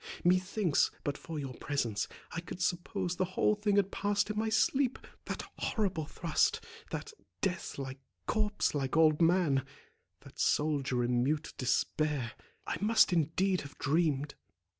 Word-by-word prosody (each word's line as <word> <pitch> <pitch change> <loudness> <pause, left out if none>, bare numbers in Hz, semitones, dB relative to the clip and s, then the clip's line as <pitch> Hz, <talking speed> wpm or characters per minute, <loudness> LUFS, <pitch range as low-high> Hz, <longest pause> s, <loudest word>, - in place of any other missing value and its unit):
Methinks, 185 -1 +3
but 145 - -1
for 160 +2 -7
your 135 -3 -4
presence, 120 -5 -1 0.2
I - - -3
could 170 +1 -8
suppose 180 0 -1
the - - +2
whole 210 0 +3
had 200 -2 +3
passed 205 +1 0
in - - -5
my 220 0 0
sleep; 245 +4 +2 0.3
that - - -4 0.2
horrible 190 -9 -1
thrust—that 170 - -2 0.3
death 190 -2 -2
like, 135 -1 -5 0.3
corpse 215 -1 +1
like 140 0 -1
old 155 -1 +5
man—that 160 -6 -1
soldier 140 -5 +1
in 120 0 +2
mute 150 +3 -1
despair; 135 0 0 0.3
I - - -2
must 215 -2 +5
indeed 175 +4 +2
have 140 - -11
dreamed." 145 -1 +1
165 Hz, 135 wpm, -32 LUFS, 140-195 Hz, 0.3 s, old